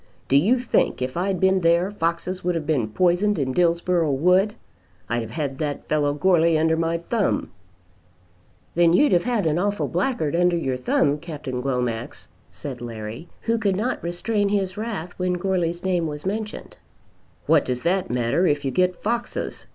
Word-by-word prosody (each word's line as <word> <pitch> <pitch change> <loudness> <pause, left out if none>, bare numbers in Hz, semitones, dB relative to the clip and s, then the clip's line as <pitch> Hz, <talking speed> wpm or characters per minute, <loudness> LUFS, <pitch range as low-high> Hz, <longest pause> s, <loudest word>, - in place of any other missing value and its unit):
Do 135 - +2
you 200 - +4
think 245 -1 +1
if 130 0 -3
I'd 185 +1 -1
been 190 +1 +3
there 170 +3 +3
foxes 175 0 -2
would 180 0 0
have 160 -2 -2
been 140 -8 +1
poisoned 180 - +2
in 130 -3 -1
Dillsborough 170 -2 +2
wood? 180 +8 +3 0.5
I'd 120 +1 -1
have 110 - -6
had 140 -1 -4
that 145 -2 -3
fellow 150 -1 +1
Goarly 165 -1 +3
under 160 +1 +2
my 165 +1 0
thumb." 205 +5 -1 1.2
"Then 170 -1 +4
you'd 290 +10 +4
have 175 +1 +3
had 235 -6 0
an 160 +1 +1
awful 205 +2 0
blackguard 175 - -1
under 175 0 +3
your 135 -6 -1
thumb, 140 +3 +1
Captain 145 -6 -5
Glomax," 125 -4 -3 0.2
said 130 -4 -7
Larry, 115 +5 -7
who 230 0 0
could 200 -3 +1
not 225 +7 -2
restrain 200 +4 -1
his 195 -2 0
wrath 205 -6 -4
when 180 0 0
Goarly's 175 -2 -1
name 180 -3 0
was 150 +1 -6
mentioned. 210 +2 -4 0.7
"What - - +4
does 125 -1 -3
that 185 +2 +1
matter, 125 +9 +1
if 145 -2 0
you 135 - 0
get 180 +2 +2
foxes?" 235 0 -3
170 Hz, 175 wpm, -23 LUFS, 145-190 Hz, 1.2 s, you